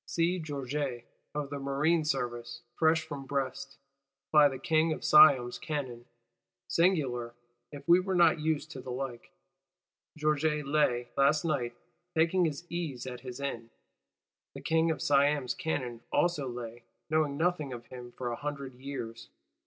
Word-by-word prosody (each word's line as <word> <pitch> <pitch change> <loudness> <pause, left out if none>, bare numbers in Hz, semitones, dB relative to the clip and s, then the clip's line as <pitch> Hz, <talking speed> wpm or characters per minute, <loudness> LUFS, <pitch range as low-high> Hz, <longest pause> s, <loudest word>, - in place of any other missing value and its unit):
See 175 +2 +1
Georget, 140 -4 -3 0.3
of 145 -2 -3
the 145 - -4
Marine 150 +4 +1
Service, 120 -3 -3
fresh 160 +3 +3
from 140 -4 -7
Brest, 135 0 -3 0.5
ply 150 -1 +7
the 135 - -5
King 160 +3 +2
of - - -8
Siam's 140 -5 +6
cannon. 130 -6 -4 0.6
Singular 130 -10 +1 0.4
(if 145 -1 -10
we 170 +1 +7
were 190 0 -2
not 170 -2 +5
used 155 0 -1
to 130 - -7
the 130 - -9
like): 125 -1 -5 0.9
Georget 150 0 +1
lay, 130 -4 +1
last 140 +4 +3
night, 125 -7 -1 0.4
taking 170 +3 +3
his 155 +1 -3
ease 160 -8 -4
at 125 -1 -6
his 125 +1 -8
inn; 120 -5 -4 0.9
the - - -7
King 160 0 +2
of 160 - -2
Siam's 145 -3 +3
cannon 125 -7 -3
also 170 -6 +1
lay, 120 -1 -7 0.3
knowing 155 -3 +1
nothing 160 -4 0
of 120 -1 -7
him, 125 -1 -10
for 120 -1 -4
a - - -2
hundred 140 -1 -5
years. 125 -3 -7
140 Hz, 150 wpm, -30 LUFS, 125-155 Hz, 0.9 s, ply